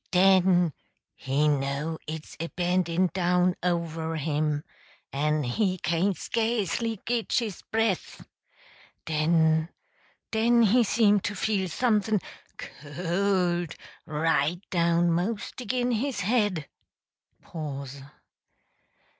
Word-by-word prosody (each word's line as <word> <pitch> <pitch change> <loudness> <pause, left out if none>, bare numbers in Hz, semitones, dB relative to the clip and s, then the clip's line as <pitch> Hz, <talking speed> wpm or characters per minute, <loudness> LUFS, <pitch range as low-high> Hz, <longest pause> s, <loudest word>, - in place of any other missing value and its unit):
Den 185 -3 +4 0.4
he 140 +3 0
know 145 +2 -1
it's 155 0 -7
a 165 - -2
bendin' 180 0 0
down 180 0 +2
over 165 -2 -1
him 150 -1 -1 0.5
en 150 +2 +1
he 185 - 0
cain't 175 +3 0
skasely 225 -1 -1
git 235 -1 -1
his 220 -7 -1
breath! 225 -4 -1 0.8
Den 160 0 +2 0.6
den 235 +1 +4
he 235 +3 +5
seem 210 -1 +3
to 205 +2 -4
feel 195 -1 0
someth' 215 +2 +1
n 210 - +3 0.4
c - - -5 0.2
o 175 +4 0
l 175 - -2
d, - - -10 0.3
right 160 +3 0
down 170 -1 +2
'most 205 +8 -2
agin 245 +1 -1
his 235 -1 -1
head! 205 -7 +1
180 Hz, 105 wpm, -27 LUFS, 160-210 Hz, 0.8 s, he